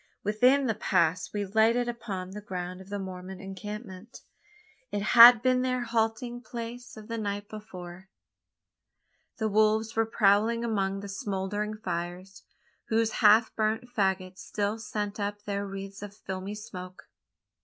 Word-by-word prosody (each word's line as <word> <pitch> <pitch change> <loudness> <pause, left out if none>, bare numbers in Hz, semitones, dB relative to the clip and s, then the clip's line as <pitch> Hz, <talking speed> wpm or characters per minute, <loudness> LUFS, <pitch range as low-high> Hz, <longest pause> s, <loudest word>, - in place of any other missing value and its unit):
Within 250 +7 +3
the 230 - +1
pass 180 -4 +1
we 205 -1 -2
lighted 225 +4 +3
upon 205 -6 -5
the 210 +2 -7
ground 180 -2 -5
of 190 - -14
the 205 - -3
Mormon 190 -1 -7
encampment. 200 +2 -8 0.7
It 205 -1 -2
had 235 +1 +9
been 255 0 +3
their 255 -1 0
halting 230 +1 -1
place 240 0 -7
of 215 -1 -10
the 230 0 -3
night 205 -1 -3
before. 190 -4 -10 1.3
The 220 - 0
wolves 215 +1 +2
were 225 0 +2
prowling 225 +2 +3
among 195 -3 -1
the 200 - -7
smouldering 205 +2 -3
fires 180 -1 -5 0.5
whose 225 0 +1
half 220 +1 +6
burnt 220 +3 -1
faggots 190 -2 0
still 210 +1 -2
sent 210 -1 -4
up 205 0 -3
their 200 -1 -3
wreaths 195 0 -7
of 205 0 -9
filmy 190 +1 -5
smoke. 185 -3 -9
210 Hz, 145 wpm, -28 LUFS, 195-225 Hz, 1.3 s, had